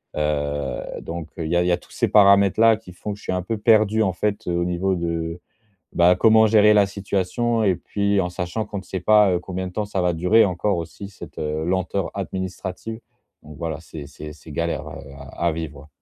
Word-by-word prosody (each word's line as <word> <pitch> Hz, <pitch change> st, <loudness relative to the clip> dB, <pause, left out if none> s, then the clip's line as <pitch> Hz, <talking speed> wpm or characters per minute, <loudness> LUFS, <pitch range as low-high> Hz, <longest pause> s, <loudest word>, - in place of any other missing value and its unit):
Heu, 75 Hz, -3 st, -2 dB
donc, 85 Hz, -1 st, -6 dB
heu, 80 Hz, -, -2 dB
il -, -, -4 dB
y -, -, +2 dB
a 90 Hz, -, +3 dB
il -, -, -1 dB
y 90 Hz, -, +2 dB
a 85 Hz, -, +3 dB
tous -, -, -20 dB
ces -, -, 0 dB
paramètres-là 100 Hz, +2 st, +5 dB
qui 90 Hz, -5 st, -14 dB
font 105 Hz, +3 st, -5 dB
que -, -, -10 dB
je -, -, -17 dB
suis -, -, -3 dB
un 90 Hz, -, -1 dB
peu 110 Hz, +5 st, -3 dB
perdu, 110 Hz, 0 st, +3 dB
en 95 Hz, -, 0 dB
fait, 105 Hz, +3 st, -2 dB
heu, 90 Hz, -, 0 dB
au 85 Hz, 0 st, 0 dB
niveau 90 Hz, +2 st, 0 dB
de, 85 Hz, -1 st, -3 dB, 0.5 s
bah, 90 Hz, +1 st, +5 dB
comment 110 Hz, +2 st, +5 dB
gérer 105 Hz, -1 st, +5 dB
la 100 Hz, -1 st, +5 dB
situation 100 Hz, +4 st, -1 dB
et 95 Hz, -3 st, +2 dB
puis 100 Hz, +3 st, -1 dB
en 90 Hz, -, -3 dB
sachant 90 Hz, +5 st, -3 dB
qu'on 105 Hz, -1 st, -6 dB
ne -, -, -7 dB
sait 95 Hz, 0 st, -5 dB
pas, 105 Hz, 0 st, +5 dB
heu, 90 Hz, -, +1 dB
combien 95 Hz, +1 st, -5 dB
de 90 Hz, -, -7 dB
temps 105 Hz, +2 st, -2 dB
ça 100 Hz, -2 st, -3 dB
va 90 Hz, -1 st, +1 dB
durer 95 Hz, +7 st, +4 dB
encore 90 Hz, +1 st, -1 dB
aussi 85 Hz, +4 st, -7 dB
cette, 95 Hz, -, -12 dB
heu, 75 Hz, +1 st, -2 dB
lenteur 95 Hz, +1 st, -1 dB
administrative. 95 Hz, +3 st, -5 dB, 0.4 s
Donc, 75 Hz, -1 st, -12 dB
voilà, 80 Hz, -2 st, -3 dB
c'est 80 Hz, -3 st, -9 dB
c'est 75 Hz, +1 st, -9 dB
c'est 80 Hz, +1 st, -15 dB
galère, 85 Hz, +3 st, -2 dB
heu, -, -, -9 dB, 0.4 s
à 85 Hz, -1 st, +1 dB
vivre. 75 Hz, -2 st, -7 dB
90 Hz, 230 wpm, -22 LUFS, 85-105 Hz, 0.5 s, paramètres-là